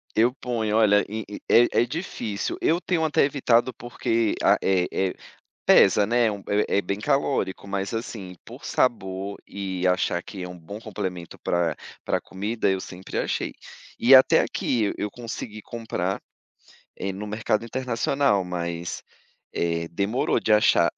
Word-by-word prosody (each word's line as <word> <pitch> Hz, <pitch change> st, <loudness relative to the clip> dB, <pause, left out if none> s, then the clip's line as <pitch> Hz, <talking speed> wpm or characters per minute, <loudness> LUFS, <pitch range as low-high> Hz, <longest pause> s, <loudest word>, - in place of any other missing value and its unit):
Eu 120 Hz, +3 st, +4 dB
ponho. 110 Hz, -3 st, 0 dB
Olha, 105 Hz, -2 st, +4 dB
e 110 Hz, 0 st, -4 dB, 0.3 s
e 120 Hz, +1 st, +6 dB
é 120 Hz, -, +3 dB
difícil, 120 Hz, -, -4 dB
eu 170 Hz, +3 st, +2 dB
tenho 165 Hz, -3 st, 0 dB
até 150 Hz, -, +3 dB
evitado 130 Hz, -3 st, +2 dB
porque 115 Hz, -2 st, -1 dB
a -, -, +5 dB
eh 95 Hz, -2 st, +2 dB
eh, 95 Hz, -1 st, 0 dB, 0.5 s
pesa 100 Hz, +1 st, +6 dB
né, 120 Hz, +1 st, +3 dB
é 110 Hz, -, +1 dB
um 100 Hz, -, -5 dB
é 100 Hz, -1 st, +1 dB
é -, -, +4 dB
bem 100 Hz, +3 st, -3 dB
calórico. 135 Hz, -7 st, 0 dB
Mas 100 Hz, +1 st, -2 dB
assim, 105 Hz, -5 st, -5 dB
por -, -, -12 dB
sabor 100 Hz, -4 st, -1 dB
e 95 Hz, -2 st, -3 dB
achar 90 Hz, -1 st, +1 dB
que 95 Hz, -3 st, -8 dB
é 90 Hz, -, -5 dB
um 90 Hz, -1 st, -9 dB
bom 100 Hz, +7 st, -9 dB
complemento 95 Hz, -6 st, -5 dB
pra 85 Hz, -3 st, 0 dB, 0.3 s
pra -, -, +1 dB
comida, 105 Hz, +2 st, -1 dB
eu 95 Hz, -1 st, 0 dB
sempre 95 Hz, 0 st, -6 dB
achei. -, -, -1 dB, 0.5 s
E 130 Hz, +3 st, +7 dB
até 130 Hz, -, +7 dB
aqui 115 Hz, -4 st, 0 dB
e -, -, -3 dB
eu 105 Hz, -, -3 dB
consegui 115 Hz, -2 st, -7 dB
comprar, 100 Hz, -5 st, -3 dB, 0.8 s
eh, 95 Hz, -, -3 dB
no 105 Hz, +2 st, -6 dB
mercado 110 Hz, +1 st, -1 dB
internacional, 125 Hz, -3 st, +1 dB
mas, 85 Hz, -1 st, -4 dB, 0.5 s
eh, 85 Hz, 0 st, -1 dB
demorou 100 Hz, +8 st, 0 dB
de 110 Hz, -, +2 dB
achar. 90 Hz, -5 st, +5 dB
105 Hz, 160 wpm, -25 LUFS, 95-120 Hz, 0.8 s, E